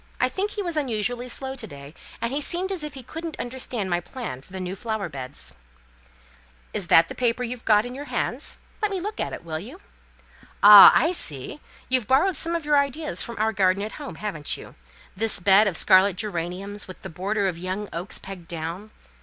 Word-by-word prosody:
I - - +3
think 395 +2 -2
he 415 -1 -4
was 345 -3 -3
unusually 245 -3 -2
slow 265 +2 -4
to 245 -4 -5
day; 140 -3 -11 0.3
and 235 +2 -2
he 290 - -1
seemed 365 +5 -1
as 365 -5 -2
if 300 -2 -6
he 265 - -9
couldn't 325 +5 -7
understand 245 -4 -4
my 175 -1 0
plans 175 - -7
for - - -20
the 190 - -6
new 185 +1 -4
flower 220 -3 -3
beds." 130 - -7 1.2
"Is 185 - -3
that 165 0 +6
the - - -7
paper 245 0 0
you've 245 0 -6
got 210 0 +4
in 245 - -6
your 285 +3 -7
hand? - - -2 0.4
Let 425 - +1
me 390 -2 -2
look 420 +4 -5
at - - -2
it, - - -7
will 155 -1 -4
you? 250 - -10 0.8
Ah, 205 -1 +12
I 325 - +4
see! 150 - -2 0.3
you've 255 -4 +1
borrowed 325 +8 +3
some 335 +2 0
of 335 -3 -3
your 295 -1 +4
ideas 280 +2 -1
from 235 -2 -5
our 220 +1 +1
garden 190 0 +2
at 215 - -5
home, 285 - -7
haven't 180 -9 -3
you? - - -12 0.4
This 225 +3 +2
bed 200 +3 +6
of 180 -4 -1
scarlet 190 0 +5
geraniums, 195 +1 -3
with 185 - -11
the - - -5
border 200 +4 -1
of 175 -3 -3
young 185 +3 -4
oaks, 170 +4 -3
pegged 190 -3 -10
down! 170 +5 -5
215 Hz, 210 wpm, -24 LUFS, 185-270 Hz, 1.2 s, Ah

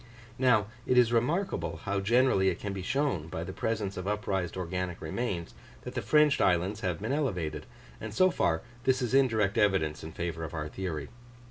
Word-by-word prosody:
Now, 125 -6 +4 0.2
it 125 - +3
is 120 -1 +5
remarkable 160 - 0
how 100 -3 -1
generally 105 -2 +3
it 90 - -2
can 100 -1 -4
be 95 - -4
shown, 130 - 0
by 80 0 -4
the 95 +2 -6
presence 105 -3 -2
of 90 +1 -4
upraised 95 -4 -1
organic 90 0 -3
remains, 85 0 -3 0.3
that - - -7
the - - -2
fringed 150 -2 +4
islands 90 +4 +2
have 90 -6 -2
been 115 +5 -1
elevated: 90 - -2 0.3
and - - -6
so 185 0 +4
far, 80 - +1 0.2
this 130 -1 +2
is 125 - -2
indirect 115 -6 +3
evidence 95 -8 +1
in 80 - -7
favour 85 0 -4
of 80 +1 -6
our 75 -1 -3
theory. 80 -5 -4
100 Hz, 190 wpm, -29 LUFS, 85-125 Hz, 0.3 s, is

